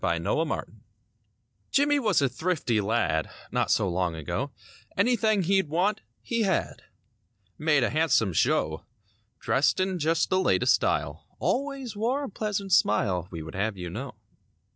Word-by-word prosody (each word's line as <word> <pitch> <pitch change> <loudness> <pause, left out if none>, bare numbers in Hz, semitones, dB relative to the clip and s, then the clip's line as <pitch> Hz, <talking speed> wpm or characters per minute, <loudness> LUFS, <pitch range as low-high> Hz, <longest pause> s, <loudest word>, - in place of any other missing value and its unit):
69 - - 0
'JIMMIE - - +1
JONES - - -7 1.0
Jimmie 290 +1 +3
was 210 - +2
a - - +4
thrifty 130 -5 -1
lad, 100 -7 0 0.2
Not - - 0
so 100 - +2
long 90 -1 -1
ago; 80 -3 -3 0.5
Anything 215 -2 +2
he'd 190 -2 +2
want, 190 +7 +1 0.2
he 235 -1 -1
had— 195 -4 0 0.8
Made 150 -4 +3
a 120 - 0
handsome 155 - +2
show. 80 0 +1 0.6
Dressed 140 +6 +2
in 185 -1 0
just 165 +2 +1
the 185 - +3
latest 190 - +3
style; - - -1
Always 270 -4 -2
wore 245 +7 0
a - - -4
pleasant 200 -2 -2
smile. 95 - +2
We 85 -4 -6
would 80 - -9
have 100 +1 -2
you 90 -2 -6
know. - - -6
165 Hz, 150 wpm, -27 LUFS, -, 1.0 s, a